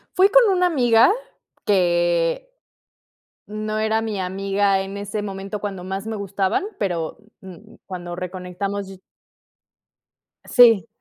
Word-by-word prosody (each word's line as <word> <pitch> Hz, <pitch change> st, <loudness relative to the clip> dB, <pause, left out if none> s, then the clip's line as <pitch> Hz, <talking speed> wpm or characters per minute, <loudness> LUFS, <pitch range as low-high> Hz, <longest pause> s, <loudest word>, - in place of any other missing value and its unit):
Fui 385 Hz, +1 st, +5 dB
con 485 Hz, -2 st, +5 dB
una 360 Hz, 0 st, +2 dB
amiga, 245 Hz, -, +4 dB, 0.5 s
que 175 Hz, -, +1 dB, 0.9 s
no 215 Hz, +1 st, -4 dB
era 220 Hz, 0 st, +1 dB
mi 215 Hz, -4 st, -3 dB
amiga 195 Hz, +1 st, 0 dB
en 195 Hz, +1 st, -6 dB
ese 205 Hz, +1 st, -4 dB
momento 195 Hz, +1 st, -5 dB
cuando 195 Hz, -3 st, -5 dB
más 195 Hz, +3 st, -5 dB
me 225 Hz, -, -3 dB
gustaban, 200 Hz, -, -1 dB, 0.2 s
pero, 175 Hz, -5 st, -2 dB, 0.2 s
mm, 185 Hz, -3 st, -13 dB
cuando 175 Hz, -2 st, -7 dB
reconectamos 185 Hz, +2 st, -5 dB
y 190 Hz, -1 st, -12 dB, 1.5 s
Sí. 230 Hz, -8 st, +5 dB
195 Hz, 120 wpm, -22 LUFS, 185-220 Hz, 1.5 s, Fui